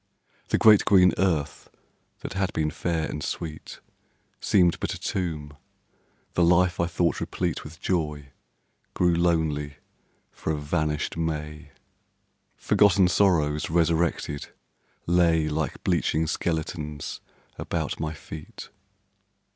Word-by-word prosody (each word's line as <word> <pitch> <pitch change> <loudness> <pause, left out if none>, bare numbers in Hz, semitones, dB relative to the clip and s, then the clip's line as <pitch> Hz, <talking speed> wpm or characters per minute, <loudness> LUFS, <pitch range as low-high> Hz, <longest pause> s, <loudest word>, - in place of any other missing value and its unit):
The - - +1
great 110 -2 +6
green 90 -3 +5
earth 85 -6 -1 0.5
that - - -6
had 95 -1 -1
been 75 -1 0
fair 80 -1 -2
and 75 - -5
sweet, 80 -2 -6 0.6
Seemed 90 -4 +3
but - - -2
a - - -9
tomb; 75 -5 -3 0.8
the 90 - +2
life 90 +1 +3
I 85 - +2
thought 85 0 0
replete 90 -3 -2
With 80 +3 -11
joy, 75 -7 -2 0.6
grew 90 -1 +3
lonely 80 -4 0 0.6
for - - -4
a 75 - -1
vanished 75 +1 -2
May. 75 -2 -4 0.9
Forgotten 100 -3 +4
sorrows 80 -6 +2
resurrected 80 -3 0 0.6
lay 85 -2 +3
Like 75 0 -3
bleaching 80 +1 +1
skeletons 80 -2 -3 0.4
about - - -3
my 80 0 -3
feet. 75 +1 -10
80 Hz, 115 wpm, -26 LUFS, 75-90 Hz, 0.9 s, great